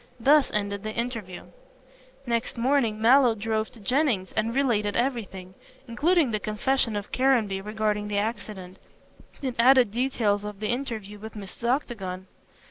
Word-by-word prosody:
Thus 285 +4 +5
ended 200 -1 -1
the 215 +1 -5
interview. 230 -7 -4 0.8
Next 235 0 -2
morning 235 -3 +1
Mallow 245 +1 +5
drove 220 +1 -2
to 235 - -14
Jennings 230 -3 0
and 220 +1 0
related 215 -7 +1
everything, 215 -7 -2 0.3
including 300 +3 +2
the 215 - -1
confession 225 +2 0
of 205 0 -5
Caranby 235 -7 +2
regarding 210 0 -1
the 205 -1 -2
accident, 205 -3 -4 0.7
and 260 -2 -1
added 250 -2 +6
details 225 -4 0
of 210 -1 -7
the 215 - -2
interview 225 -5 -4
with 220 +1 -9
Mrs. 210 +3 -5
Octagon. 195 -9 -2
220 Hz, 140 wpm, -26 LUFS, 205-250 Hz, 0.8 s, added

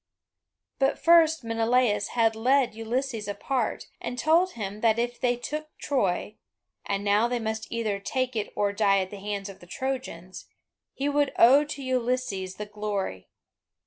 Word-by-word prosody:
But 270 0 +2
first 325 -3 +5
Menelaus 230 -2 +1
had 225 -1 +3
led 255 +2 +2
Ulysses 225 0 -3
apart, 240 +4 -2 0.2
and 245 - -4
told 330 +7 +3
him 205 -1 -5
that 225 -1 +3
if 240 +1 -2
they 245 -1 +2
took 305 +5 -5
Troy 210 -6 -1 0.5
(and 200 0 -2
now 205 +3 +3
they 245 0 -1
must 220 -1 -4
either 220 -4 -1
take 255 +4 -2
it 215 -2 -2
or 205 -1 +1
die 200 -1 +3
at 185 - -5
the 205 - -7
hands 200 0 -4
of 195 -1 -10
the 175 - -15
Trojans), 250 -7 -5 0.5
he 275 - -1
would 290 -1 +1
owe 265 +5 +7
to 285 -1 -6
Ulysses 250 -7 -1
the 210 - -5
glory. 205 - -4
230 Hz, 160 wpm, -27 LUFS, 205-260 Hz, 0.5 s, owe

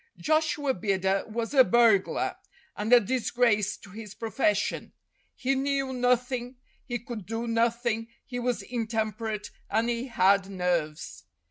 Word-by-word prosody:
Joshua 305 -3 +1
Bidder 190 -1 0
was 225 +3 -3
a 265 -2 +8
burglar, 230 -5 +3 0.4
and 210 +3 -3
a 245 - +9
disgrace 230 -2 +1
to 200 - -15
his 210 0 -9
profession. 220 -2 -1 0.4
He 265 +1 0
knew 270 0 -1
nothing, 250 0 0 0.3
he 240 -3 -3
could 225 -4 -8
do 225 +2 -3
nothing, 230 0 0 0.2
he 245 -1 -5
was 245 -4 -1
intemperate, 220 -2 -3 0.2
and 225 +3 +1
he 240 +2 -2
had 195 -4 +3
nerves. 175 -5 -2
230 Hz, 130 wpm, -27 LUFS, 210-245 Hz, 0.4 s, a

